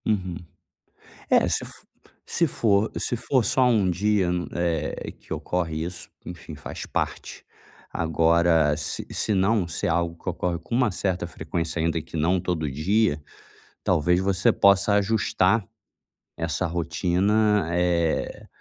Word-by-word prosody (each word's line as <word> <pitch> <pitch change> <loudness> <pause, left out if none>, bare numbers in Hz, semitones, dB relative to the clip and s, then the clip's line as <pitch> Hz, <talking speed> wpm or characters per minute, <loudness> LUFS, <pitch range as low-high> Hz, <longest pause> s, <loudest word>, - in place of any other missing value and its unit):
Uhum. 95 -5 -1 1.0
É, - - +4
se - - 0
f - - -10 0.5
se 170 - +1
for 110 -6 +1
se 120 - -1
for 125 +1 +1
só 125 +1 +3
um 110 -6 +3
dia 95 +1 +1
no 90 -1 -2
eh, 85 -2 -2
que - - -10
ocorre 80 -3 -2
isso, 90 +1 -7 0.2
enfim, 85 -2 -9
faz 70 - -7
parte. - - -4 0.5
Agora 80 -1 +3
se 75 - -3
senão, 100 -1 +1
se 85 - -3
é - - +1
algo 85 0 0
que - - -5
ocorre 90 -1 -2
com 85 +8 -7
uma 125 -2 +3
certa 90 -1 -2
frequência, 80 0 -4
ainda 80 0 0
que 80 - -9
não 85 +4 +2
todo 85 -4 -2
dia, 80 +3 +1 0.6
talvez 90 +1 +2
você 95 -1 +2
possa 100 +1 +4
ajustar 100 -1 +2 0.7
essa 85 +3 -1
rotina, 90 +4 +1
eh, 85 -2 0
90 Hz, 140 wpm, -25 LUFS, 85-100 Hz, 1.0 s, É